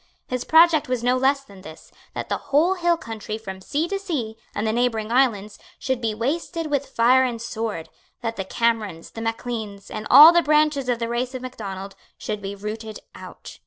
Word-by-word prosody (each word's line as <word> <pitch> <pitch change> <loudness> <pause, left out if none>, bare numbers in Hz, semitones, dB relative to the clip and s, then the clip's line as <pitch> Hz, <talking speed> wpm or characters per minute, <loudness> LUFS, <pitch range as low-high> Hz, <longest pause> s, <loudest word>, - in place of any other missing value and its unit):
His 250 -1 -3
project 320 -3 +5
was 250 -2 -1
no 250 +1 +3
less 270 +2 +2
than 200 -7 -15
this, 160 -3 -13 0.2
that - - -4
the - - -1
whole 310 +7 +4
hill 345 -2 +1
country 220 -4 -6
from 190 -4 -8
sea 295 - -1
to 395 +2 -3
sea, 285 - -4 0.2
and 205 - -2
the 220 - 0
neighbouring 230 -2 0
islands, 215 -5 +1 0.2
should 260 -2 -2
be 220 -2 -1
wasted 310 +6 -3
with 285 -1 0
fire 255 +1 +4
and 240 -3 -2
sword, 220 -7 -4 0.3
that 230 -1 -3
the 195 - -3
Camerons, 215 -5 -1
the 225 - -8
Macleans, 225 -3 -5
and 215 0 -5
all 305 +3 +11
the 345 - +5
branches 300 -4 +2
of 245 - +1
the 230 0 -3
race 245 +2 -2
of 255 - -6
Macdonald, 195 -6 -7 0.2
should 210 -1 -5
be 195 0 -5
rooted 215 +2 -6 0.2
out. - - -11
235 Hz, 200 wpm, -23 LUFS, 215-275 Hz, 0.3 s, all